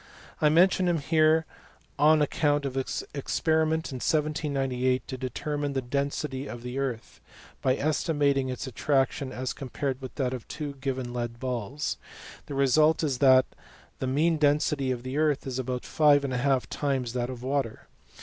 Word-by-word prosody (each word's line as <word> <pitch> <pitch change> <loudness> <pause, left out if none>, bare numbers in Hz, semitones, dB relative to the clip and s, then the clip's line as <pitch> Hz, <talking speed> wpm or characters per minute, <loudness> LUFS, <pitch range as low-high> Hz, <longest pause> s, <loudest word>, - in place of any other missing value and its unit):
T 150 - +4
mention 180 +3 +4
him 175 -1 +2
here 155 +1 +3 0.5
on 155 +1 +5
account 145 0 +1
of 135 - -3
his 135 0 -2
experiment 160 +2 0
in 130 - -4
1798 135 -4 0
to 130 - -4
determine 145 +3 -3
the 135 - 0
density 140 +1 -2
of 120 0 -8
the 125 +2 -4
earth, 125 -5 -4 0.4
by 130 -1 +2
estimating 145 -2 +1
its 125 - -4
attraction 135 +1 0
as 130 0 -3
compared 135 0 -4
with 130 - -8
that 130 -3 -1
of 125 -3 -7
two 150 -2 -5
given 130 -3 -3
lead 120 -1 -4
balls: 130 +2 -3 0.5
the 145 - -5
result 150 +4 +4
is 135 -5 0
that 130 -2 +6 0.5
the 130 - -2
mean 155 +5 +2
density 145 -2 +2
of 125 -2 -2
the 130 +3 -3
earth 150 -3 +1
is 130 -1 -3
about 125 -1 -3
five 145 -2 +4
and 135 -2 -2
a - - 0
half 135 0 +1
times 135 -5 -2
that 125 -1 -2
of 125 -1 -7
water. 130 -4 -2
135 Hz, 170 wpm, -27 LUFS, 130-150 Hz, 0.5 s, that